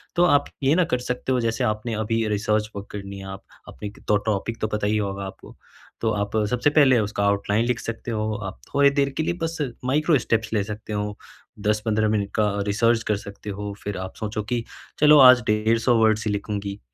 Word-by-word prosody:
तो 175 - +4
आप 145 -4 +4 0.2
ये 135 +3 +4
ना 180 - +4
कर 125 - +2
सकते 125 +1 -2
हो 130 - +2
जैसे 115 +2 -1
आपने 110 0 -1
अभी 115 +1 0
रिसर्च 105 +1 0
वर्क 100 0 -6
करनी 100 -1 -7
है 95 - -9
आप 95 - -11 0.2
अपने 100 +11 -7
क - - -21 0.2
टॉपिक 110 +2 -2
तो 110 - +1
पता 105 -1 -2
ही 105 +1 +1
होगा 100 -1 -3
आपको। 95 - -11 0.5
तो 115 - +1
आप 105 0 -2 0.2
सबसे 125 +4 +2
पहले 140 -4 +5
उसका 105 -1 -1
आउटलाइन 100 +2 +1
लिख 125 -1 0
सकते 115 +1 -5
हो, 110 0 -1
आप 95 - -6
थोड़ी 140 0 +5
देर 140 0 +1
के 160 - +1
लिए 175 - 0
बस 165 0 -2 0.3
माइक्रो 150 +4 +3
स्टेप्स 110 -1 -1
ले 105 -2 +2
सकते 105 +1 -7
हो, 105 0 -3 0.4
10-15 105 +1 +1
मिनट 100 -2 0
का 110 - +3 0.2
रिसर्च 115 +3 +2
कर 105 - 0
सकते 100 +1 -9
हो, 100 0 -5
फिर 105 -2 -4
आप 95 - -6
सोचो 105 -1 -3
कि 120 -1 0 0.4
चलो 150 0 +7
आज 125 -2 +9
150 115 +3 +2
वर्ड्स 110 -1 +3
ही - - +1
लिखूँगी। 100 -1 -4
110 Hz, 215 wpm, -24 LUFS, 105-120 Hz, 0.5 s, आज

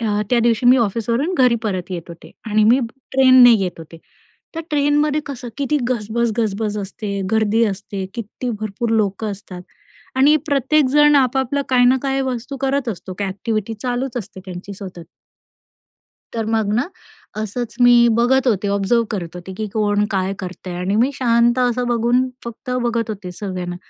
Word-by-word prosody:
अ, 210 -2 0
त्या 245 - +4
दिवशी 235 +1 +2
मी 255 +2 +7
ऑफिसवरून 235 - 0
घरी 250 -2 +5
परत 190 -3 -3
येत 175 -2 -4
होते 170 0 -12 0.2
आणि 215 0 +2
मी 240 +4 +5 0.3
ट्रेनने 255 -2 +7
येत 190 -6 0
होते, 165 0 -11 0.6
तर 330 - -3
ट्रेनमध्ये 295 +1 +2
कसं 255 -3 -7
किती 285 +1 0
गजबज 235 0 -1
गजबज 210 -1 -1
असते, 200 0 -5
गर्दी 220 +1 +2
असते, 200 -1 -4
किती 235 +2 -5
भरपूर 215 +2 -3
लोकं 210 -1 0
असतात 190 -2 -9 0.5
आणि 280 +3 +5
प्रत्येकजण 295 +1 +3
आपापला 265 +1 +1
काही 250 -1 +4
ना 255 +2 +5
काही 270 -1 0
वस्तू 260 +1 -4
करत 270 -2 0
असतो, 185 -2 -6
काय 200 -1 -1
एक्टिविटी 215 +2 -3
चालूच 250 0 -2
असते 205 -3 -8
त्यांची 185 +2 -8
सतत. 185 -4 -9 1.3
तर 225 - -1
मग 210 -2 0
ना, 245 +5 +1 0.5
असंच 220 +2 -4
मी 245 0 +7 0.2
बघत 265 +3 +3
होते, 205 -2 0
ऑब्झर्व्ह 200 +4 +1
करत 180 -6 -4
होते, 180 +2 -8
की 215 - -3
कोण 210 -1 +1
काय 190 -1 0
करतंय 180 -1 -7
आणि 185 +3 -1
मी 245 +5 +3
शांत 240 -1 +2
असं 250 0 +1
बघून 240 +2 +2 0.2
फक्त 235 +2 -8
बघत 235 -1 -1
होते 195 -4 -6
सगळ्यांना. 180 -2 -5
230 Hz, 165 wpm, -19 LUFS, 200-255 Hz, 1.3 s, मी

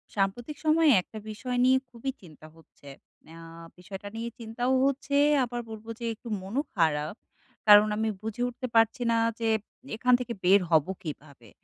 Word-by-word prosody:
সাম্প্রতিক 225 +9 -2
সময়ে 310 0 +5
একটা 220 - -12
বিষয় 245 +4 -4
নিয়ে 260 +1 +5
খুবই 245 +2 -5
চিন্তা 155 -4 -14
হচ্ছে। 160 -3 -20 0.5
আ - - -12 0.4
বিষয়টা 190 +2 -9
নিয়ে 230 +1 -4
চিন্তাও 240 +3 -2
হচ্ছে 275 +1 -1 0.3
আবার 240 0 -4
বলবো 220 0 -9
যে 235 - -5
একটু 225 - -14
মনও 205 +9 -2
খারাপ। 155 -3 +1 0.5
কারণ 210 0 +9
আমি 220 0 0
বুঝে 220 +2 -5
উঠতে 255 +1 -6
পারছি 225 +3 +3
না 230 - +2 0.2
যে 230 - -1 0.5
এখান 250 +3 +2
থেকে 245 -1 -4
বের 190 +3 +6
হব 155 -3 +4 0.2
কীভাবে? 140 -7 -9
225 Hz, 160 wpm, -27 LUFS, 190-245 Hz, 0.5 s, কারণ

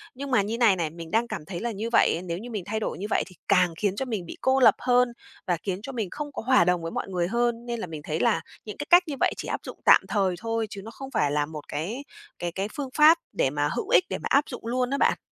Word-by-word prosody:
Nhưng 275 +1 -6
mà 210 - +4
như 220 +4 -3
này 225 -6 +5
này, 165 -3 -1
mình 165 0 -10
đang 230 +2 +2
cảm 195 -9 -6
thấy 170 0 -5
là 235 0 -2
như 220 +3 -4
vậy, 175 -6 +3
nếu 170 -1 -3
như 235 +5 -8
mình 210 -6 -4
thay 220 +1 -2
đổi - - -3
như 200 - -5
vậy - - +2
thì 185 - -15
càng 180 -3 +4
khiến 200 -2 0
cho 265 - -2
mình 215 -8 -3
bị - - -9
cô 265 0 +3
lập 255 - +7
hơn 250 0 +3 0.4
và 175 -2 +1
khiến 190 -1 -2
cho 275 - -6
mình 220 -7 -3
không 295 -1 -5
có - - -5
hòa 255 -5 +4
đồng 180 -1 +2
với 165 - -4
mọi - - -3
người 175 -2 0
hơn. 235 +2 0
Nên 235 -1 -3
là 185 - -4
mình 155 -2 -7
thấy 155 +1 -3
là 235 -3 +2 0.2
những 210 - -7
cái 290 - -4
cách 350 +1 +8
như 285 - -3
vậy - - +2
chỉ - - -6
áp - - -2
dụng - - -8
tạm - - +8
thời 190 -4 +1
thôi, 225 0 -2
chứ 195 - -7
nó 225 - -9
không 270 +2 -9
phải 150 - +1
là 145 0 +1
một 150 -1 -9
cái 210 - -4 0.4
cái 175 -1 -2
cái 195 +3 -3
phương 275 -3 -3
pháp 310 +2 +8 0.2
để 130 - +1
mà 145 +1 0
hữu - - -3
ích, 180 - +6
để 190 - -2
mà - - -4
áp 280 +1 +4
dụng 245 -3 -8
luôn 250 +1 0
á 280 - 0
bạn. - - +3
215 Hz, 305 wpm, -26 LUFS, 175-245 Hz, 0.4 s, cách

